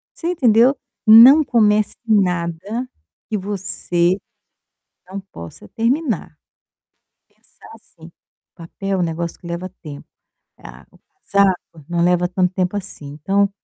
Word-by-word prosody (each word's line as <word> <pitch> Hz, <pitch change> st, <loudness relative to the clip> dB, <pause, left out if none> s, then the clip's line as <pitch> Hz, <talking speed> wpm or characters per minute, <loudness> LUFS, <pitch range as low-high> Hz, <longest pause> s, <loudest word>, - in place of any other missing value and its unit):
você 335 Hz, -, -5 dB
entendeu? 250 Hz, -3 st, +3 dB, 0.3 s
Não 250 Hz, +8 st, +9 dB
comece 215 Hz, -5 st, +2 dB
nada 190 Hz, +3 st, -1 dB, 0.4 s
que 215 Hz, -, -1 dB
você 190 Hz, -2 st, -1 dB, 0.9 s
não 195 Hz, +1 st, -6 dB
possa 100 Hz, -, -12 dB
terminar. 230 Hz, -, -2 dB, 0.9 s
Pensar -, -, -21 dB
assim, -, -, -17 dB, 0.4 s
papel 190 Hz, +3 st, -5 dB
um -, -, +1 dB
negócio 170 Hz, 0 st, -4 dB
que -, -, -17 dB
leva 170 Hz, +2 st, -5 dB
tempo, 145 Hz, -3 st, -10 dB, 0.5 s
tá, -, -, -14 dB, 0.4 s
casaco 190 Hz, -6 st, 0 dB
não 170 Hz, -1 st, 0 dB
leva 180 Hz, 0 st, +2 dB
tanto 180 Hz, 0 st, -1 dB
tempo 185 Hz, +2 st, -1 dB
assim, 185 Hz, -6 st, -8 dB
então, 195 Hz, +7 st, 0 dB
195 Hz, 115 wpm, -19 LUFS, 170-215 Hz, 0.9 s, Não